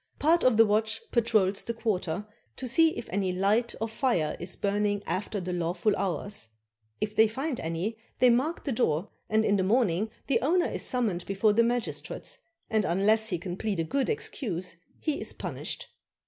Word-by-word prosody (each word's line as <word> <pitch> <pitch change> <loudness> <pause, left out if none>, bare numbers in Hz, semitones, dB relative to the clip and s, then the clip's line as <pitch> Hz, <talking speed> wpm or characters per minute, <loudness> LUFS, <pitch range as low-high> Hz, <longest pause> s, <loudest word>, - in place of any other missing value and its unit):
Part 330 +3 +3
of 250 -4 +4
the 225 - +8
watch 220 +1 +1
patrols 215 -5 +2
the 235 - -4
quarter, 205 -5 -1 0.3
to 260 - -5
see 320 +6 +5
if 235 - -5
any 190 -1 0
light 205 +6 +1
or 225 - -1
fire 220 - 0
is 175 +2 -2
burning 205 0 0
after 205 +2 -2
the 180 0 -4
lawful 175 +4 0
hours; 195 - -1 0.5
if 210 0 -3
they 220 0 +6
find 265 +5 -3
any, 170 +8 -3 0.2
they 250 -1 +6
mark 275 +8 0
the 280 - -2
door, 195 -6 0 0.2
and 220 0 +3
in 205 - +3
the 190 - +1
morning 210 -1 +2 0.2
the 275 - +2
owner 345 +6 +3
is - - -3
summoned 220 -9 0
before 200 +2 +2
the 230 - +4
magistrates, 240 0 -2 0.3
and 220 -1 +1
unless 215 +5 +2
he 180 - 0
can 175 +1 -5
plead 210 -4 -2
a - - +2
good 270 - -1
excuse 185 - -3 0.2
he 305 -2 -2
is - - -4
punished. - - -5
215 Hz, 185 wpm, -28 LUFS, 185-235 Hz, 0.5 s, the